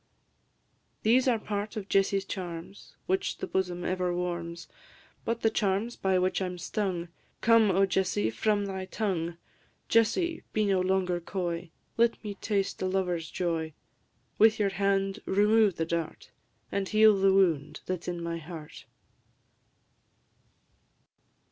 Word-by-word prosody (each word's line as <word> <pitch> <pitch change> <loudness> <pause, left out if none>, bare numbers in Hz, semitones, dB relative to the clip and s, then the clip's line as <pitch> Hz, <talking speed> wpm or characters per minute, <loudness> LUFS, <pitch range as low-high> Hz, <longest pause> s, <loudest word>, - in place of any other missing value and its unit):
These 250 +4 +4
are 240 -3 +4
part 210 +1 -4
of 200 -2 -5
Jessie's 195 0 +2
charms, 175 0 -7
Which 190 +1 0
the - - -4
bosom 180 -2 -2
ever 180 -1 0
warms; 170 -1 -4 0.6
But 230 0 -1
the 225 - +3
charms 205 +3 0
by 190 -1 +1
which 185 +1 +1
I 190 - 0
'm 180 0 -6
stung, 180 -2 -2 0.3
Come, 230 -2 +5
O 195 +1 +4
Jessie, 185 - 0
from 205 - +1
thy 190 -1 -4
tongue! 175 -5 -2 0.5
Jessie, 325 - +2
be 215 -1 +2
no 195 -2 +2
longer 185 -1 +1
coy; 175 -1 -3 0.3
Let 235 0 +2
me 210 -1 -4
taste 200 -1 -2
a 185 - +1
lover's 180 -3 -1
joy; 165 -3 -2 0.7
With 220 0 +6
your 205 -2 +2
hand 195 +1 0
remove 210 0 +4
the 165 - -1
dart, 165 0 -4 0.4
And 195 -1 -1
heal 215 -1 +6
the 195 0 +4
wound 160 -6 +2
that 185 -2 -3
's - - -12
in 175 -1 -3
my 170 0 -3
heart. 160 -1 -10
190 Hz, 140 wpm, -29 LUFS, 175-205 Hz, 0.7 s, With